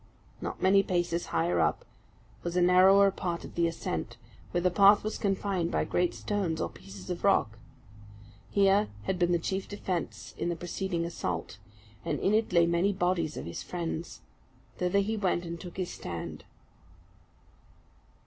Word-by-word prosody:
Not - - -5
many 195 +1 +6
paces 175 -2 -1
higher 85 +1 +1
up, 80 - +1 0.6
was 175 0 -4
a - - +4
narrower 190 +2 +6
part 175 -3 -4
of - - -11
the 170 -1 +2
ascent, 165 - -4 0.3
where 175 - 0
the 180 0 +2
path 200 +2 +6
was 215 - -3
confined 195 -3 0
by - - +1
great 180 0 0
stones, 190 -6 -2
or - - -1
pieces 95 -1 -10
of 175 - -5
rock. 110 - +2 0.9
Here 200 +1 +4 0.2
had 180 - -2
been 175 0 +3
the 175 - +4
chief 190 +3 -3
defence 185 -4 -4
in - - 0
the 170 - -1
preceding 175 0 -3
assault, 90 - -4 0.4
and - - -2
in 200 - +2
it 220 -1 +2
lay 170 -1 +5
many 170 +4 +2
bodies 175 -4 0
of - - -5
his 85 - -5
friends. 170 -1 -5 0.6
Thither 180 +2 +2
he 220 +3 -1
went 185 -3 0
and 170 0 -6
took 180 -1 -9
his 185 -2 -2
stand. 85 -1 -6
175 Hz, 165 wpm, -29 LUFS, 170-195 Hz, 0.9 s, many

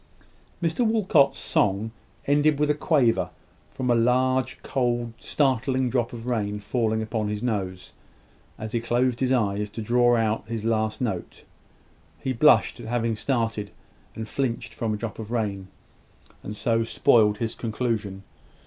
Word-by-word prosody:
Mr 165 +9 +1
Walcot's 200 -11 +3
song 105 +3 0 0.3
ended 145 +1 +3
with 150 0 +3
a - - +3
quaver, 140 -6 +2 0.4
from 125 -1 -2
a - - +4
large, 130 +2 +2
cold, 120 -3 -1
startling 130 -2 +1
drop 120 -3 0
of 115 -1 -8
rain 105 -4 -1
falling 110 0 -1
on 110 -3 0
his 105 +1 -3
nose, 95 -6 -3 0.6
as 110 0 -6
he 115 - -1
closed 120 +1 +1
his 130 -1 +1
eyes 105 -4 +1
to 110 - -8
draw 120 +2 +3
out 110 -1 0
his 110 -1 -4
last 110 0 0
note. 100 -8 -4 0.8
He 130 - -2
blushed 150 0 +4
at 115 - -8
having 115 -1 0
started 115 -4 -1 0.5
and 110 0 -5
flinched 125 -1 -2
from 110 -2 -2
a - - -5
drop 110 0 -6
of 110 0 -7
rain, 100 -5 -2 0.7
and 105 - -6
so 115 +1 +1
spoiled 110 -2 +3
his 115 0 -2
conclusion. 110 -4 -3
115 Hz, 150 wpm, -25 LUFS, 110-125 Hz, 0.8 s, a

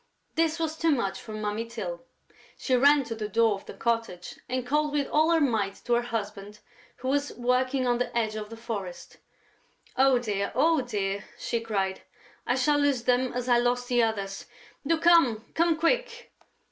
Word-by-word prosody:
This 325 0 +1
was 320 -1 -2
too 330 +1 +1
much 235 -10 0
for 220 - -10
Mummy 215 +1 -2
Tyl. 210 -7 -6 0.6
She 260 - +1
ran 285 +3 +5
to 230 -2 -5
the 215 -2 -5
door 225 +1 +3
of 195 - -8
the - - -9
cottage 230 -6 -2
and 255 0 -2
called 300 +3 0
with 285 -2 0
all 310 +2 +3
her 335 -1 +4
might 220 -9 0
to 240 - +1
her 235 - +3
husband, 210 -3 -5 0.4
who 260 - -4
was 285 +1 0
working 255 +2 +1
on 245 -1 +1
the 245 -1 -2
edge 215 -2 0
of 210 -1 -5
the 230 - -9
forest: 200 -6 -6 0.8
"Oh, 265 -1 +4
dear, 205 -4 -2
oh, 315 +3 +3
dear!" 200 -5 -3
she 235 - -2
cried. 195 -4 -2 0.5
"I 245 - +2
shall 290 +3 +2
lose 280 -4 +1
them 250 +1 +2
as 250 0 -3
I 240 -1 +4
lost 245 +1 0
the 245 -1 +3
others!... 200 -4 -2 0.4
Do 330 +1 +3
come!... 315 -10 +4
Come 335 -1 +2
quick...." 475 +8 -1
245 Hz, 185 wpm, -27 LUFS, 215-285 Hz, 0.8 s, ran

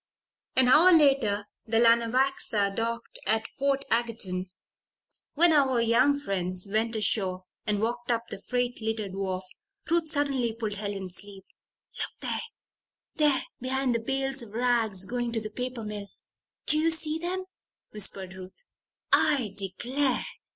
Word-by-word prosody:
An 260 -1 +6
hour 330 +8 +7
later 270 - +4 0.2
the 225 0 +1
Lanawaxa 230 -3 +2
docked 230 +1 -3
at 220 0 +1
Portageton. 230 -9 0 0.9
When 335 +2 +5
our 270 -4 +3
young 240 +5 +3
friends 185 -7 -2
went 220 +3 0
ashore 190 -3 0 0.2
and 210 -1 +1
walked 240 +2 -2
up 230 -1 +1
the 195 - -5
freight 245 0 -2
littered 220 -3 -3
wharf, 190 -1 -3 0.4
Ruth 335 -1 +1
suddenly 275 -6 0
pulled 220 -2 -3
Helen's 200 -3 -3
sleeve. 200 -1 -4 0.6
"Look - - -4
there! - - -2 0.8
There 295 -4 +3 0.2
behind 260 0 0
the 230 - +1
bales 270 +3 -1
of 220 -3 -11
rags 225 -5 +1
going 240 +1 -3
to 225 - 0
the 215 -1 -7
paper 250 0 -5
mill. 210 -1 -6 0.6
Do 305 - +5
you 325 +1 +3
see 320 -1 +1
them?" 370 +2 -3 0.5
whispered 195 -2 -1
Ruth. 190 - -12 0.5
"I 265 -10 +3
declare!" 245 +8 0
230 Hz, 135 wpm, -28 LUFS, 205-270 Hz, 0.9 s, hour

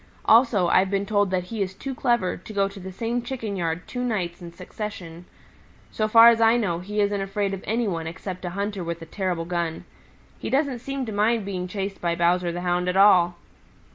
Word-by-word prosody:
Also 225 -6 +5
I've 185 +2 +3
been 200 0 0
told 205 -1 +1
that 185 -1 0
he 220 - -2
is 190 -1 -2
too 270 +6 -5
clever 240 -7 +1
to 200 +4 -11
go 200 -1 +2
to 200 0 -10
the 190 0 -8
same 235 +5 -2
Chicken 235 -4 -5
yard 170 -1 -3
two 250 -1 -4
nights 185 -8 -2
in 170 -1 -8
succession. 180 -2 -8 0.7
So 215 - 0
far 230 +2 +8
as 230 -1 +3
I 225 +1 +5
know, 180 -8 -1
he 205 +4 -4
isn't 205 -1 0
afraid 195 0 -2
of 190 - -6
any 230 +1 0
one 165 -4 -3
except 180 +3 -7
a 180 - -3
hunter 200 -2 -2
with 170 0 -4
a - - -8
terrible 175 -1 -3
gun. 170 -2 -3 0.5
He - - -4
doesn't 270 -2 0
seem 275 +1 -4
to 220 - -5
mind 215 +1 +1
being 185 -2 -4
chased 195 +1 -5
by 170 -1 0
Bowser 175 +1 +2
the 175 +1 -5
Hound 180 0 0
at 180 - 0
all." 180 -3 +5
195 Hz, 220 wpm, -24 LUFS, 180-220 Hz, 0.7 s, far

